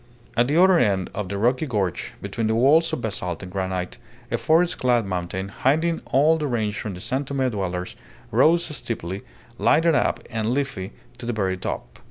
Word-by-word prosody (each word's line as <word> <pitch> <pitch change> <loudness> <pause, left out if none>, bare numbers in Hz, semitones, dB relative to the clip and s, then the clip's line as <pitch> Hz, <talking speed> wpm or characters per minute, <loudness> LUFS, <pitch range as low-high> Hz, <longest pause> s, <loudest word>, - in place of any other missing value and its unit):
At 120 +2 +3
the 150 +4 +1
other 185 -1 +6
end 100 - +1
of 105 -3 -4
the 100 - -3
rocky 125 +8 +1
gorge, 100 -8 -2
between 110 +3 -2
the 110 - +1
walls 150 +8 +4
of - - -2
basalt 90 -6 -3
and 90 - -8
granite, 95 0 -3 0.3
a - - +1
forest 170 +2 +3
clad 120 -3 +2
mountain, 95 +1 -3
hiding 160 +10 +1
all 155 +5 +4
the 150 - -1
range 110 -5 -1
from 100 -4 -4
the - - -8
San 130 +8 -1
Tome 135 -1 -1
dwellers, 90 -4 -3 0.4
rose 160 +9 +4
steeply, 95 -6 -4 0.4
lighted 165 +1 +4
up - - +2
and 110 +2 0
leafy 135 -10 -2 0.3
to 120 - -6
the 120 - 0
very 95 -4 0
top. 90 - -6
115 Hz, 190 wpm, -24 LUFS, 95-140 Hz, 0.4 s, other